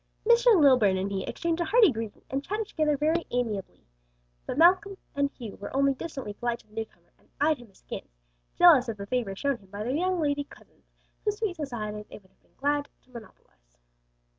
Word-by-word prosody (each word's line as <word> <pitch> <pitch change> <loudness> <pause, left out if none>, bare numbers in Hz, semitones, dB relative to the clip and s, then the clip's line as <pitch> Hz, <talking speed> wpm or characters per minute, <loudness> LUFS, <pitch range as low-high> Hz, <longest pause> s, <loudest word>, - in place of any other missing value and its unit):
Mr. 475 -3 +6
Lilburn 250 -10 +5
and 195 +1 -2
he 190 -1 -2
exchanged 335 0 -2
a - - +1
hearty 425 - +5
greeting 225 -3 -6
and 270 +1 -1
chatted 420 +4 -3
together 305 -6 0
very 320 +4 +1
amicably, 225 -6 -3 0.6
but - - -3
Malcom 375 +4 +4 0.2
and 280 0 +1
Hugh 235 -7 -9
were 205 - -7
only 275 0 +3
distantly 270 -6 -6
polite 240 +2 -2
to - - -32
the 210 - -25
newcomer 225 0 -8
and - - -30
eyed 300 -1 +2
him 240 -3 -14
askance, - - -10 0.4
jealous 315 -9 +6
of 220 - -4
the 200 - -6
favor 215 -3 -2
shown 280 +5 -1
him 195 -4 -22
by 205 +2 -5
their 245 +4 -2
young 365 +4 0
lady 285 -2 0
cousins, - - -20 0.4
whose 420 -1 -1
sweet 425 -5 -2
society 215 -9 -5
they - - -9
would 190 -2 -21
have - - -38
been - - -35
glad 290 +1 0
to 255 - -28
monopolize. - - -15
275 Hz, 205 wpm, -27 LUFS, 215-330 Hz, 0.6 s, Mr